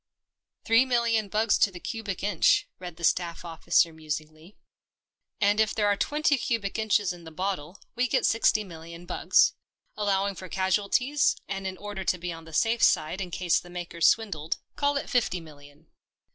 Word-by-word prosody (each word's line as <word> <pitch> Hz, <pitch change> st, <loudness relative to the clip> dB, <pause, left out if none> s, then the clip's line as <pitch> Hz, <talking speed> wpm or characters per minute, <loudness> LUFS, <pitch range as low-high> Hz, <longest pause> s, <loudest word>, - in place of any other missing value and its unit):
" -, -, -54 dB
Three 230 Hz, +3 st, +5 dB
million 235 Hz, -4 st, +1 dB
bugs 215 Hz, +1 st, +2 dB
to 205 Hz, -, +4 dB
the 180 Hz, -2 st, -10 dB
cubic 205 Hz, -3 st, -5 dB
inch," 200 Hz, -5 st, +3 dB
read 180 Hz, -2 st, -8 dB
the 170 Hz, -, -13 dB
staff 170 Hz, 0 st, 0 dB
officer 165 Hz, 0 st, +1 dB
musingly. 155 Hz, +3 st, -7 dB, 0.4 s
" -, -, -60 dB
And 205 Hz, +1 st, +3 dB
if 220 Hz, 0 st, +2 dB
there 210 Hz, -, +1 dB
are 205 Hz, 0 st, +3 dB
twenty 295 Hz, +4 st, +1 dB
cubic 225 Hz, -3 st, -2 dB
inches 210 Hz, -3 st, +1 dB
in 175 Hz, -1 st, -13 dB
the 160 Hz, -, -9 dB
bottle, 180 Hz, 0 st, -4 dB, 0.2 s
we 250 Hz, +2 st, 0 dB
get -, -, +1 dB
sixty 220 Hz, -1 st, +3 dB
million 170 Hz, -1 st, -11 dB
bugs. 175 Hz, -, +3 dB, 0.4 s
Allowing 200 Hz, -1 st, 0 dB
for 185 Hz, -1 st, -10 dB
casualties, 205 Hz, -, +1 dB
and 195 Hz, -1 st, -4 dB
in 185 Hz, 0 st, -5 dB
order 205 Hz, -1 st, -6 dB
to 180 Hz, -, +1 dB
be 175 Hz, 0 st, -5 dB
on 165 Hz, 0 st, -11 dB
the 160 Hz, -, -12 dB
safe 225 Hz, +8 st, +1 dB
side 155 Hz, +5 st, +2 dB
in 180 Hz, -, -4 dB
case 175 Hz, 0 st, +1 dB
the 175 Hz, -, -14 dB
makers 175 Hz, -2 st, 0 dB
swindled, 165 Hz, -9 st, 0 dB, 0.2 s
call 285 Hz, 0 st, +1 dB
it -, -, -4 dB
fifty 235 Hz, -8 st, 0 dB
million." 150 Hz, -1 st, -16 dB
190 Hz, 185 wpm, -27 LUFS, 170-220 Hz, 0.4 s, Three